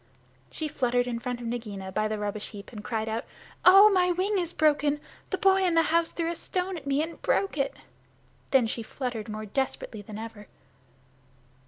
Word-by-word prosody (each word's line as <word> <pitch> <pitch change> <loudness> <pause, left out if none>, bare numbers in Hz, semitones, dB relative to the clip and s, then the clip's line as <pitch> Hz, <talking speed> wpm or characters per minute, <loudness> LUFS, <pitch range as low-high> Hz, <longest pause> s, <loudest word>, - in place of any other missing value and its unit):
She 315 - -3
fluttered 245 -3 +1
in 240 -2 -3
front 245 0 -4
of - - -6
Nagaina 210 -5 -4
by 215 +3 0
the 215 0 -2
rubbish 205 0 -3
heap 205 -2 -10
and 210 -3 -8
cried 220 0 -2
out, 225 +1 -2 0.4
"Oh, 390 +3 +9
my 360 -2 +3
wing 380 +3 +1
is 345 -2 -2
broken! 295 -2 +2 0.3
The 380 - -1
boy 385 -1 +4
in 350 -2 +2
the 330 - +5
house 335 0 +3
threw 335 0 -1
a - - -2
stone 365 +3 -2
at 290 -5 -8
me 280 +2 +2
and 330 +1 -7
broke 395 - +1
it." 275 -2 -1 0.7
Then 265 -3 +4
she 230 +1 -3
fluttered 230 -2 -5
more 215 0 -5
desperately 225 -1 -3
than 205 +1 -9
ever. 220 -2 -8
255 Hz, 195 wpm, -28 LUFS, 220-335 Hz, 0.7 s, Oh